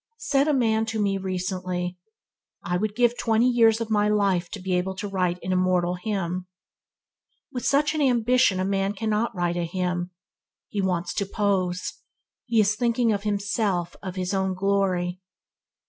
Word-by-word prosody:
Said 290 -11 +1
a - - +3
man 225 -4 +2
to 220 0 -2
me 200 -1 +1
recently, 185 -1 -3 0.7
"I 175 - -1
would 210 +3 -1
give 240 0 +3
twenty 225 +1 +3
years 230 -2 +4
of 225 -1 -4
my 210 -1 +3
life 195 -4 +1
to 210 - -6
be 185 0 -2
able 185 +1 0
to 205 - -4
write 180 -3 0
an 185 - -2
immortal 180 -1 +2
hymn." 180 -1 -3 1.0
With 250 - -4
such 290 +2 +3
an 310 - -1
ambition 245 -5 +3
a 185 - 0
man 195 0 0
cannot 215 +1 -1
write 175 -1 0
a 175 - 0
hymn. 180 0 -2 0.6
He 205 - -2
wants 180 -2 -1
to 200 - -2
pose. 190 -3 -1 0.5
He 230 -2 +2
is 210 0 +3
thinking 235 0 +1
of 200 - -2
himself, 200 -3 -1
of 185 -2 -6
his 185 +1 -2
own 190 -1 0
glory. 185 -2 0
195 Hz, 170 wpm, -25 LUFS, 180-220 Hz, 1.0 s, years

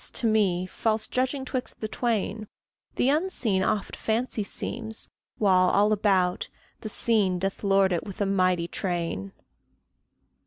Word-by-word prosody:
to - - -1
me, 200 -5 +2
false 215 +3 -1
judging 260 +3 -1
'twixt 255 -1 -4
the 215 - -3
twain, 215 -2 -2 0.5
The 255 - +2
Unseen 280 - +1
oft 205 +1 -1
fancy 225 0 -1
seems, 220 +2 -4 0.3
while, 185 -3 +4
all 205 +2 +3
about, 190 -4 +1 0.3
The 215 - -6
Seen 210 -5 +2
doth 195 +3 -3
lord 195 -1 +4
it 175 - 0
with 200 - -9
a 200 - +2
mighty 185 -3 +2
train. 170 - -3
205 Hz, 140 wpm, -26 LUFS, 185-225 Hz, 0.5 s, while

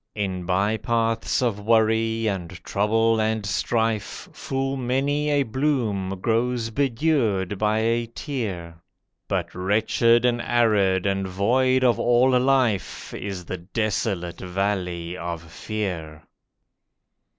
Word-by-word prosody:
In 95 -4 -3
by 100 +4 +1
paths 115 +1 0
of 115 -4 0
worry 110 +1 +2
and 95 -5 -2
trouble 115 +2 +2
and 110 -1 0
strife 110 +1 -1
Full 135 0 -2
many 135 +4 0
a 145 -1 +3
bloom 110 -7 -1
grows 115 0 0
bedewed 115 - 0
by 110 +1 +2
a 115 +1 +1
tear, 95 - -5 0.5
But - - -2
wretched 110 +5 +2
and 120 -1 +2
arid 105 -7 +2
and 95 -1 0
void 130 +8 +2
of 125 -2 +3
all 120 +2 +4
life 125 -6 0
Is 95 -3 -5
the 95 - -4
desolate 95 -2 -2
Valley 90 -2 -2
of 85 -2 -5
Fear. 85 -4 -5
110 Hz, 115 wpm, -24 LUFS, 95-120 Hz, 0.5 s, all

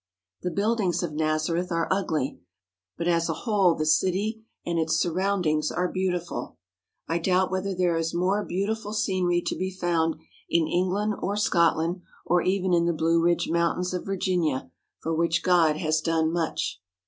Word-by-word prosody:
The 180 - -1
buildings 200 -2 0
of 165 -3 -3
Nazareth 155 +3 0
are 165 -1 0
ugly, 160 -8 -1 0.6
but 170 - -2
as 170 -1 +2
a - - 0
whole 195 -7 +3
the 155 - -2
city 190 +8 +1 0.2
and 170 -1 0
its 160 0 +1
surroundings 175 -4 +1
are 180 +1 0
beautiful. 180 -2 -3 0.5
I 165 +2 0
doubt 185 +2 +2
whether 190 +1 -2
there 175 -2 +1
is 165 0 -1
more 190 +4 +1
beautiful 205 +3 -2
scenery 185 -5 +1
to - - -1
be 185 - -2
found 170 -3 0 0.3
in 170 -1 +3
England 185 +5 0
or 200 +1 -2
Scotland, 170 -2 +2 0.2
or 175 0 +3
even 185 0 +1
in 170 -1 +3
the 170 - +2
Blue 165 +1 +2
Ridge 170 +1 +2
Mountains 170 +2 0
of 180 - -3
Vir 195 0 -2
ginia, 170 -8 0 0.3
for 165 - -2
which 165 +1 +1
God 165 -4 +4
has 155 -2 0
done 160 0 +1
much. 165 - -2
175 Hz, 170 wpm, -26 LUFS, 165-190 Hz, 0.6 s, God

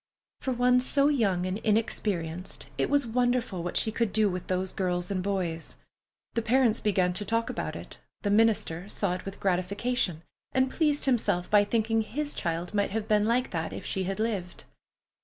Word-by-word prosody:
For 260 - -2
one 250 0 +4
so 280 +3 +3
young 200 -11 +1
and 185 +3 -2
inexperienced, 195 -6 -1
it - - 0
was 285 -2 +2
wonderful 245 -5 0
what 175 +1 -2
she 220 - +2
could 230 -1 0
do 210 -1 +2
with 180 0 -5
those 185 0 -1
girls 180 0 -2
and 190 -2 0
boys. 180 -4 -3 0.6
The 230 - 0
parents 235 0 +3
began 185 -4 +1
to 195 - +1
talk 230 +3 0
about - - -4
it, - - -9 0.2
the 205 - +1
minister 205 -4 +2
saw 200 -3 0
it 180 - -6
with 195 0 -7
gratification, 185 -1 0 0.3
and 260 0 +2
pleased 295 -3 +1
himself 225 -9 +1
by 205 -1 +6
thinking 225 +1 +1
his 290 +7 -3
child 170 +1 -3
might 205 -1 +1
have 215 +1 -3
been 210 0 +3
like 245 +2 +1
that 160 -2 -3
if - - -7
she 190 -1 -1
had 195 +2 -3
lived. 200 -6 -2
210 Hz, 185 wpm, -28 LUFS, 180-235 Hz, 0.6 s, by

